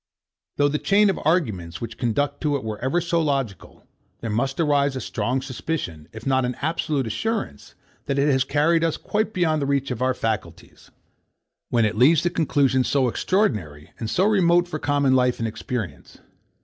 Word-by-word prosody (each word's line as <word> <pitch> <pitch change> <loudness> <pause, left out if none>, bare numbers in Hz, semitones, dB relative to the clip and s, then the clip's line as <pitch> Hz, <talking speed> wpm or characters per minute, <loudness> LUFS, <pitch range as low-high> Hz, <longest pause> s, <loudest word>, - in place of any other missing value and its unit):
Though 145 - +4
the 150 +1 -1
chain 200 0 +4
of - - -5
arguments 110 - 0
which 115 -1 -7
conduct 140 +4 -1
to 150 -2 +1
it 140 - -3
were 110 -1 -5
ever 135 +8 0
so 170 -1 0
logical, 135 -9 -3 0.4
there 115 - -3
must 135 +6 -1
arise 140 -3 +2
a - - -2
strong 125 +3 -2
suspicion, 130 - -4
if 110 +1 -10
not 130 -1 +2
an 125 0 -2
absolute 150 -3 -1
assurance, 155 - -3 0.3
that 140 - -1
it 140 +1 +3
has 130 -3 +3
carried 160 +4 +2
us 165 -2 0
quite 215 +1 -1
beyond 165 -6 +1
the 140 - -1
reach 140 -1 0
of 125 -1 -4
our 130 0 +1
faculties, 110 -3 -5 0.8
when 115 -2 +2
it 105 - -1
leads 145 +7 +5
to 175 - +1
conclusions 135 -6 +2
so 135 -3 +2
extraordinary, 105 - -1
and 110 - -3
so 185 - +2
remote 175 -4 +3
from 155 -3 -5
common 145 -2 +2
life 125 -1 +2
and 115 - -2
experience. 110 - -6
140 Hz, 185 wpm, -23 LUFS, 115-160 Hz, 0.8 s, leads